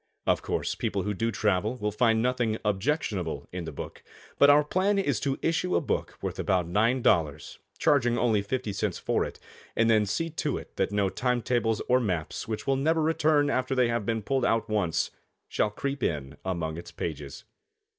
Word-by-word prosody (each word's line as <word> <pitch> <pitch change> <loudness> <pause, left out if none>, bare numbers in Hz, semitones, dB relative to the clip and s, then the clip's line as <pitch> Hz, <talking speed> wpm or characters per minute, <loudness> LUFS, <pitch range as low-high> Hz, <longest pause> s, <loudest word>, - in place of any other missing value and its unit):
Of - - +2
course, - - -1
people - - -2
who 105 - -1
do 115 +4 -1
travel 105 +2 0
will 105 -2 -1
find 115 +1 +2
nothing 120 -3 +1
objectionable 100 - -1
in 90 -2 -5
the 80 - -5
book, 70 - -8 0.4
but 140 - +7
our 145 +1 +7
plan 190 +6 +1
is 145 - +1
to 135 -1 -1
issue 165 +2 +1
a - - +4
book - - -3
worth - - -3
about 90 -3 +1
$9, 90 - +1 0.2
charging 125 -6 +3
only 110 -3 +2
fifty 110 +1 -3
cents 95 - -1
for - - 0
it, - - -8 0.4
and 115 0 +3
then 105 -2 +3
see 165 +11 -1
to 150 -3 -2
it - - -10
that 95 - +1
no 100 -1 +1
time 125 +2 0
tables 115 -3 0
or 125 +1 +4
maps 90 -9 -2
which 110 -1 -4
will 135 -1 +2
never 160 +4 +2
return 155 -2 +3
after 130 +1 0
they 125 -2 +3
have 115 -2 0
been 110 +1 -1
pulled 135 +3 0
out 115 -2 +2
once, 100 -7 0 0.4
shall 105 - +1
creep 140 +5 -4
in 70 - -2
among 85 -4 -2
its 85 0 -9
pages. 75 -4 -6
115 Hz, 195 wpm, -28 LUFS, 95-135 Hz, 0.4 s, but